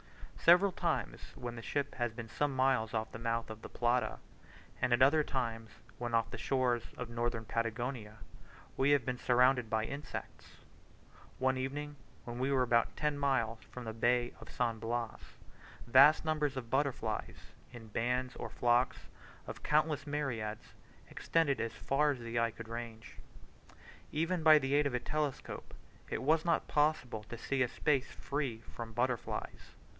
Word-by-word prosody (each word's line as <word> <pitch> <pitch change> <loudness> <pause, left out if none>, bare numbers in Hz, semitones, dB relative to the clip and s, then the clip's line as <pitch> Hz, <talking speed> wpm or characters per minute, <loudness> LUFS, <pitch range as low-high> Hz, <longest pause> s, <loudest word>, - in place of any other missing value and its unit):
Several 180 +4 +6
times - - -2
when 120 -1 -6
the 115 - -7
ship 140 +4 -2
has 120 -2 -1
been 115 0 -7
some 145 +4 -1
miles 130 -4 +2
off 110 0 -2
the - - -7
mouth 115 -1 -1
of 110 0 -9
the - - -8
Plata, 120 +1 +1 0.6
and 125 - +1
at 120 +1 +3
other 150 +3 +5
times 115 -5 -3 0.3
when 120 -1 -1
off 115 0 +1
the - - -5
shores 125 -3 +1 0.2
of 125 -1 -5
Northern 115 -1 -2
Patagonia, 115 0 -3 0.6
we 135 +2 +2
have 145 -4 +4
been 125 -1 -2
surrounded 125 -1 +3
by 110 0 +1
insects. 140 +3 -7 0.8
One 130 0 +2
evening, 145 +3 -4 0.3
when 120 0 -6
we 130 +2 +1
were 130 -2 +3
about 115 -2 +2
ten 150 -1 0
miles 120 -5 +1
from 125 - -7
the 110 -1 -5
Bay 120 +2 +2
of - - -12
San 115 -2 -1
Blas, 115 0 -3 0.7
vast 140 +7 +7
numbers 150 -3 0
of 120 -3 -6
butterflies, 140 -1 -2 0.2
in 115 -3 -11
bands 125 +4 -1
or - - -5
flocks 120 +1 +2 0.5
of - - -7
countless 155 -1 +1
myriads, 120 -8 -3 0.4
extended 160 -5 +1
as 115 - -2
far 150 +2 +1
as 140 - 0
the 115 0 -2
eye 115 0 +2
could 115 +1 -10
range. 115 -1 -7 0.9
Even 165 +3 0
by 155 -1 +8
the 135 -1 0
aid 145 0 +4
of 130 - -2
a - - +1
telescope 150 0 -3 0.3
it - - -3
was 155 +3 +3
not 170 -1 +1
possible 145 -7 +1
to 120 - -7
see 135 +3 -1
a 125 - +4
space 135 0 0
free 135 -6 -3
from 115 -1 -6
butterflies. 125 +1 -3
125 Hz, 165 wpm, -33 LUFS, 115-140 Hz, 0.9 s, by